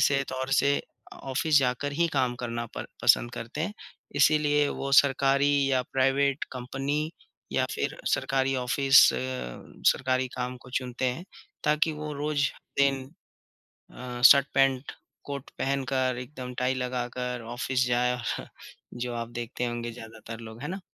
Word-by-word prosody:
से 140 Hz, -1 st, +3 dB
तौर 130 Hz, 0 st, -3 dB
से 140 Hz, +1 st, +4 dB, 0.4 s
अ, -, -, -11 dB
ऑफ़िस 145 Hz, +3 st, +2 dB
जाकर 135 Hz, +2 st, 0 dB
ही 170 Hz, +3 st, +2 dB
काम 130 Hz, -3 st, +1 dB
करना 120 Hz, -1 st, -3 dB
पर -, -, -5 dB, 0.2 s
पसंद 120 Hz, -, +5 dB
करते 115 Hz, +6 st, -6 dB
हैं। 185 Hz, +6 st, -1 dB, 0.4 s
इसीलिए 145 Hz, 0 st, +4 dB
वो 140 Hz, -, -4 dB
सरकारी 140 Hz, 0 st, +4 dB, 0.2 s
या 130 Hz, -1 st, +2 dB
प्राइवेट 135 Hz, +1 st, +2 dB
कंपनी 135 Hz, +4 st, -2 dB, 0.4 s
या -, -, +2 dB
फिर -, -, -2 dB, 0.2 s
सरकारी 135 Hz, 0 st, 0 dB
ऑफ़िस 135 Hz, +2 st, +4 dB, 0.9 s
सरकारी 130 Hz, 0 st, 0 dB
काम 125 Hz, 0 st, -3 dB
को 125 Hz, 0 st, -15 dB
चुनते 125 Hz, 0 st, -3 dB
हैं, 130 Hz, +8 st, -1 dB, 0.4 s
ताकि 150 Hz, +1 st, +2 dB
वो 150 Hz, 0 st, -5 dB
रोज 145 Hz, 0 st, 0 dB, 0.3 s
दिन 135 Hz, -1 st, +2 dB, 0.9 s
अ, 125 Hz, -1 st, -7 dB
शर्ट, 140 Hz, +2 st, +8 dB
पैंट, 135 Hz, 0 st, +2 dB, 0.3 s
कोट 140 Hz, -2 st, -6 dB
पहनकर 130 Hz, -2 st, 0 dB
एकदम 125 Hz, -1 st, -7 dB
टाई 125 Hz, +1 st, +1 dB
लगाकर, 125 Hz, -1 st, -3 dB
ऑफ़िस 125 Hz, +2 st, -1 dB
जाए 125 Hz, 0 st, +2 dB
और 120 Hz, -, -4 dB, 0.5 s
जो 120 Hz, 0 st, -4 dB
आप 115 Hz, 0 st, -4 dB
देखते 120 Hz, +1 st, -3 dB
होंगे 120 Hz, 0 st, -3 dB
ज्यादातर 115 Hz, -1 st, -10 dB
लोग, 115 Hz, 0 st, -10 dB
है 145 Hz, -, -4 dB
ना? 190 Hz, +4 st, -4 dB
130 Hz, 145 wpm, -27 LUFS, 125-140 Hz, 0.9 s, शर्ट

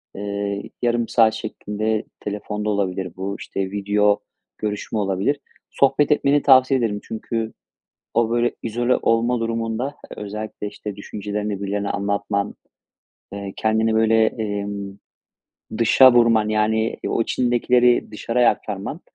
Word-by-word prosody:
eee, 100 Hz, 0 st, -3 dB, 0.2 s
yarım 120 Hz, -1 st, +1 dB
saat 110 Hz, -2 st, +4 dB
şeklinde 110 Hz, 0 st, -3 dB
telefonda 105 Hz, +1 st, -4 dB
olabilir; 95 Hz, -3 st, -2 dB
bu, 95 Hz, +2 st, -4 dB
işte, 95 Hz, -1 st, -4 dB
video 105 Hz, 0 st, +2 dB, 0.4 s
görüşme 105 Hz, +1 st, -3 dB
olabilir, 100 Hz, +8 st, 0 dB, 0.3 s
sohbet 140 Hz, +2 st, +2 dB
etmeni 145 Hz, 0 st, +3 dB
tavsiye 130 Hz, -1 st, +6 dB
ederim. 105 Hz, -4 st, -1 dB
Çünkü 110 Hz, 0 st, -4 dB, 0.6 s
o, 115 Hz, -1 st, +2 dB
böyle, 120 Hz, +1 st, +1 dB
izole 120 Hz, +2 st, +1 dB
olma 115 Hz, +2 st, +2 dB
durumunda 115 Hz, +4 st, -2 dB, 0.2 s
özellikle, 105 Hz, 0 st, -5 dB
işte, 105 Hz, 0 st, -7 dB
düşüncelerini 105 Hz, 0 st, -4 dB
birilerine 100 Hz, 0 st, -2 dB
anlatman, 100 Hz, 0 st, -1 dB, 0.8 s
eee 100 Hz, -1 st, -6 dB
kendini 110 Hz, 0 st, +1 dB
böyle, 110 Hz, 0 st, +4 dB
emm, 100 Hz, -2 st, -4 dB, 0.8 s
dışa 120 Hz, +3 st, +7 dB
vurman, 115 Hz, -3 st, +4 dB
yani 110 Hz, +1 st, +1 dB
o -, -, +1 dB
içindekileri 120 Hz, 0 st, +2 dB
dışarıya 115 Hz, +3 st, +2 dB
aktarman, 105 Hz, -, -5 dB
110 Hz, 115 wpm, -22 LUFS, 100-115 Hz, 0.8 s, dışa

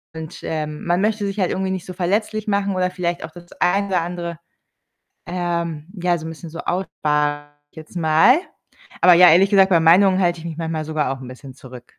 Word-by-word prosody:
Und, 160 Hz, -1 st, -8 dB
ähm, 150 Hz, -1 st, -4 dB
man 175 Hz, +2 st, +1 dB
möchte 210 Hz, -1 st, 0 dB
sich 200 Hz, +1 st, -4 dB
halt 185 Hz, -, +1 dB
irgendwie 190 Hz, 0 st, -2 dB
nicht 185 Hz, -2 st, -4 dB
so 185 Hz, -, -8 dB
verletzlich 210 Hz, +4 st, -2 dB
machen 200 Hz, -1 st, 0 dB
oder 180 Hz, 0 st, 0 dB
vielleicht 175 Hz, -2 st, -3 dB
auch 160 Hz, -, -13 dB
das 175 Hz, 0 st, -15 dB
eine 200 Hz, +3 st, +1 dB
oder 180 Hz, -3 st, 0 dB
andere, 170 Hz, -1 st, -5 dB, 0.9 s
ähm, 170 Hz, -3 st, -3 dB
ja, 175 Hz, -1 st, +1 dB
so 160 Hz, -, -9 dB
'n -, -, -5 dB
bisschen 165 Hz, +1 st, -9 dB
so 165 Hz, +2 st, -9 dB
aussparen, 185 Hz, +2 st, -2 dB, 0.6 s
sage 145 Hz, -, -32 dB, 0.2 s
ich -, -, -28 dB
jetzt 160 Hz, +3 st, -12 dB
mal. 165 Hz, -, +4 dB, 0.6 s
Aber 180 Hz, -, +7 dB
ja, 180 Hz, +1 st, +8 dB
ehrlich 190 Hz, +5 st, +5 dB
gesagt, 195 Hz, -2 st, +5 dB
bei 170 Hz, -3 st, +4 dB
Meinungen 185 Hz, +4 st, +5 dB
halte 175 Hz, -2 st, +1 dB
ich 165 Hz, -, -11 dB
mich 165 Hz, -1 st, -6 dB
manchmal 160 Hz, -2 st, -3 dB
sogar 155 Hz, -3 st, -1 dB
auch 135 Hz, 0 st, -6 dB
'n 125 Hz, -, -9 dB
bisschen 130 Hz, +1 st, -11 dB
zurück. 125 Hz, -2 st, -12 dB
175 Hz, 220 wpm, -20 LUFS, 160-190 Hz, 0.9 s, ja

